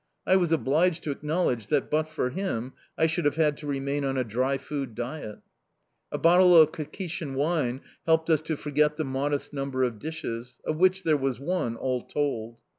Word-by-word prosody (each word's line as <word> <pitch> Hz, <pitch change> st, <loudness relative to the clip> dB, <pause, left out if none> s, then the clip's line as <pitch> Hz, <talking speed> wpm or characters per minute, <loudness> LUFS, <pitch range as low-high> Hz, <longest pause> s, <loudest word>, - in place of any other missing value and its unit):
I 190 Hz, -, +4 dB
was 175 Hz, -3 st, +2 dB
obliged 165 Hz, +3 st, +2 dB
to 150 Hz, -, -2 dB
acknowledge 145 Hz, -, -1 dB
that, 145 Hz, -2 st, 0 dB
but 155 Hz, +1 st, +1 dB
for 140 Hz, -5 st, -2 dB
him, 130 Hz, -8 st, -3 dB, 0.2 s
I 160 Hz, -, +4 dB
should 165 Hz, +2 st, 0 dB
have 145 Hz, -1 st, +2 dB
had 155 Hz, -2 st, +2 dB
to 150 Hz, -, -8 dB
remain 140 Hz, 0 st, -1 dB
on 135 Hz, -1 st, -1 dB
a 130 Hz, -, +2 dB
dry 130 Hz, +4 st, 0 dB
food 135 Hz, -4 st, -5 dB
diet. 120 Hz, -3 st, -6 dB, 0.7 s
A -, -, -2 dB
bottle 180 Hz, +1 st, +6 dB
of 155 Hz, -1 st, +6 dB
Kakhetian 160 Hz, -2 st, -5 dB
wine 140 Hz, -3 st, 0 dB, 0.3 s
helped 160 Hz, 0 st, +3 dB
us 155 Hz, -2 st, +4 dB
to 155 Hz, -1 st, -3 dB
forget 150 Hz, +1 st, +1 dB
the 155 Hz, -, -1 dB
modest 140 Hz, +2 st, -2 dB
number 135 Hz, -2 st, -1 dB
of 120 Hz, -4 st, -1 dB
dishes 125 Hz, -5 st, -6 dB
of 155 Hz, -, -1 dB
which 185 Hz, +2 st, +3 dB
there 155 Hz, -2 st, +3 dB
was 135 Hz, -3 st, -1 dB
one, 140 Hz, -6 st, -1 dB
all 125 Hz, +1 st, -1 dB
told. 115 Hz, -6 st, -3 dB
145 Hz, 190 wpm, -27 LUFS, 130-160 Hz, 0.7 s, bottle